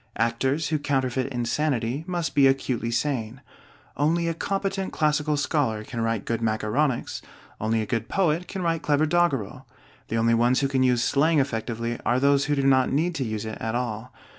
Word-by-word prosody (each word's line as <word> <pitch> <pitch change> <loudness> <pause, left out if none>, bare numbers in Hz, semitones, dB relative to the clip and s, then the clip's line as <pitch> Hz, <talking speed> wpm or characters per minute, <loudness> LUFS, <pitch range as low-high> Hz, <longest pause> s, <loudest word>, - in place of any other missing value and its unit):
Actors 130 +7 0
who 155 -1 0
counterfeit 130 -2 -1
insanity 125 +1 -1
must 175 -2 -2
be 140 -1 +5
acutely 130 -3 0
sane. 120 -1 -2 0.6
Only 165 +4 +1
a 165 - 0
competent 195 +2 -2
classical 150 -1 +1
scholar 140 -7 0
can 115 +1 -5
write 115 -2 -1
good 115 0 -2
macaronics; 115 +5 -1 0.4
only 110 +1 0
a - - -4
good 115 +1 -3
poet 175 -2 +1
can 190 -2 -5
write 165 -1 0
clever 150 +1 +2
doggerel. 135 - 0 0.4
The 115 - -2
only 115 +1 +3
ones 120 +3 +3
who 140 - +2
can 135 -1 0
use 125 -2 +3
slang 155 +5 +2
effectively 115 -2 -2
are 120 +1 +2
those 140 +1 +3
who 145 - +1
do 140 - 0
not 130 -1 +3
need 160 +6 +1
to 145 - -2
use 110 -2 -3
it 110 - -6
at 110 +1 -2
all. 120 -1 -3
130 Hz, 185 wpm, -25 LUFS, 115-150 Hz, 0.6 s, be